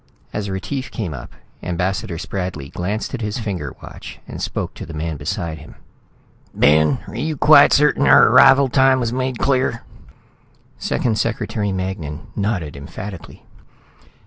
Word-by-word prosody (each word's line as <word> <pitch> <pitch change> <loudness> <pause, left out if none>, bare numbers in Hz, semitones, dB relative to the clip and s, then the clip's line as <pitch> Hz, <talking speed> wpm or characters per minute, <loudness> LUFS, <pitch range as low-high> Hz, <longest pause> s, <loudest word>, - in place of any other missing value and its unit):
As 105 -1 -3
Retief 130 +8 -4
came 95 -9 -4
up, 60 -3 -9 0.3
Ambassador 90 +2 -2
Spradley 90 -6 -5
glanced 100 +6 -3
at 130 - -4
his 105 +1 -3
finger 95 - -4
watch - - -10
and - - -7
spoke - - -3
to - - -8
the 80 - -8
man 80 +1 -3
beside 80 +2 -4
him. 75 - -13 0.8
"Ben, 80 - +3
are - - -9
you 155 -1 -2
quite 145 +1 +7
certain 150 - +3
our - - +7
arrival 135 +1 +7
time 130 0 +4
was 120 -1 -1
made 130 -1 -2
clear?" 130 -3 0 1.0
Second 110 -3 -1
Secretary 110 -2 -1
Magnan 90 -6 -4
nodded 100 -8 -2
emphatically. 85 +6 -9
100 Hz, 145 wpm, -20 LUFS, 80-125 Hz, 1.0 s, quite